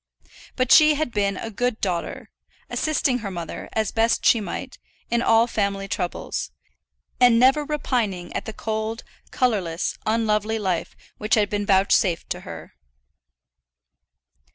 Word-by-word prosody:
But 255 -1 0
she 305 -1 +7
had 305 -4 -2
been 200 -3 0
a 225 - -6
good 245 +1 -1
daughter, 175 -4 -3 0.4
assisting 285 -5 0
her 210 -3 -5
mother, 170 -3 -6
as 220 -2 0
best 225 +1 +1
she 230 - +5
might, - - -6 0.3
in 235 0 +2
all 225 0 +4
family 200 -4 -2
troubles, 180 -2 -3 0.7
and 245 -2 +6
never 265 +5 +4
repining 235 - -2
at - - -3
the - - -5
cold, 220 +1 -3 0.3
colourless, 190 -10 -1
unlovely 220 -1 +1
life 185 -6 -2 0.2
which 215 0 +2
had 210 -2 +1
been 205 -1 -2
vouchsafed 190 -2 +2
to - - -2
her. - - -10
220 Hz, 135 wpm, -23 LUFS, 200-245 Hz, 0.7 s, she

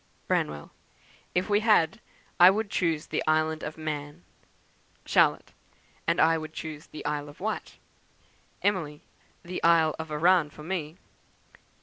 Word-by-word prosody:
"Branwell. 75 -1 -1 0.6
'If 180 +1 +1
we 205 -1 +3
had 210 -7 +3 0.4
I 175 +1 +10
would 205 +1 -1
choose 165 -4 0
the - - -2
Island 155 0 +1
of 155 - -6
Man.' 145 - -5 0.8
"Charlotte. - - +2 0.6
'And - - +2
I 165 0 +4
would 155 0 -8
choose 155 -2 -7
the 155 - -10
Isle 145 0 -2
of 145 - -15
Wight.' 215 +3 -4 0.9
"Emily. 165 -8 -1 0.4
'The 180 +1 -5
Isle 165 -2 +4
of 160 0 -5
Arran 160 +1 +3
for 150 - -13
me.' 165 -2 -4
160 Hz, 135 wpm, -27 LUFS, 150-180 Hz, 0.9 s, I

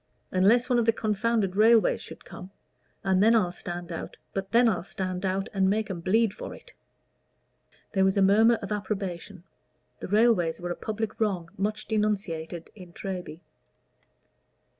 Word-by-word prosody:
"Unless 210 +7 +4
one 250 -2 +2
of 235 - +1
the - - +7
confounded 215 -2 0
railways 225 +2 +4
should - - -10
come. 185 - -10 0.5
But 190 -1 +2
then 225 +4 +5
I'll 185 -6 +2
stand 175 0 -7
out 190 0 -1
and 190 -1 +2
make 215 0 0
'em 175 - -5
bleed 210 +4 +2
for - - -8
it." - - -17 1.2
There 190 -2 +2
was 190 +1 +2
a - - +4
murmur 220 +4 +5
of 200 - -6
approbation; 195 -3 -4 0.6
the - - -6
railways 205 -6 +3
were 175 0 -4
a - - -2
public 220 0 -4
wrong 185 -6 -1
much 210 +2 -2
denunciated 190 -7 -2
in 180 -4 -13
Treby. 180 -4 -6
195 Hz, 140 wpm, -27 LUFS, 180-220 Hz, 1.2 s, the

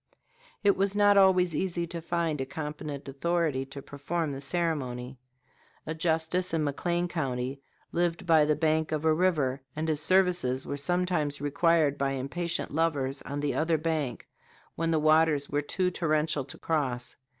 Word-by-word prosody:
It 200 -1 +5
was 195 +1 0
not 205 0 +5
always 185 -3 +5
easy 175 +1 -1
to 170 0 -6
find 165 -3 -1
a - - -1
competent 150 -1 -6
authority 145 -1 -1
to 135 0 -9
perform 150 +3 -3
the 135 0 -6
ceremony. 135 -7 -2 0.7
A 160 - -3
justice 165 +2 0
in 160 - +1
McLean 175 +4 -1
County 135 -5 -3 0.3
lived 170 -1 0
by 160 -3 +5
the 150 0 +2
bank 155 +1 +1
of 155 0 -2
a 160 - +5
river, 155 -6 +1
and 155 +1 -2
his 155 -2 +1
services 175 -7 +2
were - - -3
sometimes 155 -1 0
required 145 0 +2
by 135 0 0
impatient 165 +7 -3
lovers 145 -4 0
on 145 +1 -5
the 145 -1 0
other 160 0 +1
bank 155 -4 -2 0.5
when 165 0 -1
the 165 - +2
waters 155 -2 +3
were 145 +1 +1
too 180 +5 -1
torrential 155 -4 0
to 135 - -10
cross. 130 -6 -1
155 Hz, 160 wpm, -28 LUFS, 140-170 Hz, 0.7 s, It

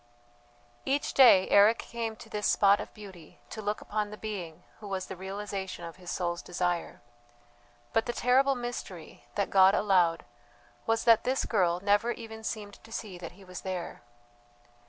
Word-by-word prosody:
Each 280 +2 -1
day 235 -8 +7
Eric 210 +3 +6
came 230 -2 -5
to - - -13
this 210 0 -2
spot 200 0 +4
of - - -8
beauty 190 -7 -13
to 220 - -6
look 210 0 -2
upon 210 0 -2
the 210 - -9
being 190 -8 -6 0.2
who 210 - -9
was 190 -2 -3
the - - -7
realization 190 -1 -5
of 165 +1 -9
his 180 -1 -10
soul's 175 -1 -2
desire. 175 -1 -2 0.9
But 225 +2 +1
the - - 0
terrible 265 +3 +3
mystery, 240 -9 -7
that 200 -1 -1
God 190 +1 +6
allowed, 180 -6 +2 0.6
was 225 0 +1
that 230 -2 +5
this 260 +1 0
girl 180 -5 +1
never 205 +3 +3
even 220 -1 -9
seemed 205 -3 -6
to 225 - -15
see 205 -5 -6
that 170 -1 -8
he 195 +2 -16
was 180 -1 -8
there. 185 -2 -5
200 Hz, 170 wpm, -29 LUFS, 185-220 Hz, 0.9 s, day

